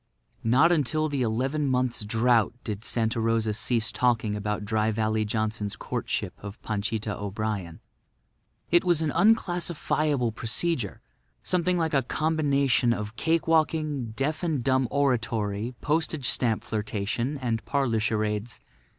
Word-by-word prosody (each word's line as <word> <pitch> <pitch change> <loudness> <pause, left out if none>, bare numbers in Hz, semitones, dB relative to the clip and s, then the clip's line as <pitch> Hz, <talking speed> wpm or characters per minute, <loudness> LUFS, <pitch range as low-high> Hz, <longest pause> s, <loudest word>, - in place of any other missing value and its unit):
Not 130 +9 +5
until 155 0 +1
the 140 -2 -1
eleven 130 +6 0
months' 125 -3 0
drought 115 +1 +2
did 105 -1 -5
Santa 115 0 0
Rosa 115 -1 +1
cease 115 0 0
talking 115 -4 +1
about 105 0 -3
Dry 110 0 +1
Valley 110 0 0
Johnson's 110 -1 -2
courtship - - -3
of 100 +2 -8
Panchita 110 0 -2
O'Brien. 100 -4 -4 0.9
It 175 0 +5
was 175 -3 +2
an 155 - 0
unclassifiable 170 - +1
procedure; 120 - -2 0.4
something 180 0 +1
like 165 -2 0
a 135 - +4
combination 140 -4 +1
of 105 0 -5
cake 165 +4 0
walking, 155 -6 +1
deaf 150 +4 -1
and 155 -8 -1
dumb 130 -1 +2
oratory, 115 -5 0
postage 155 -3 0
stamp 115 -4 +1
flirtation 110 +5 -2
and 115 -4 -2
parlour 135 -6 +1
charades. 105 +1 -1
120 Hz, 130 wpm, -27 LUFS, 110-150 Hz, 0.9 s, Not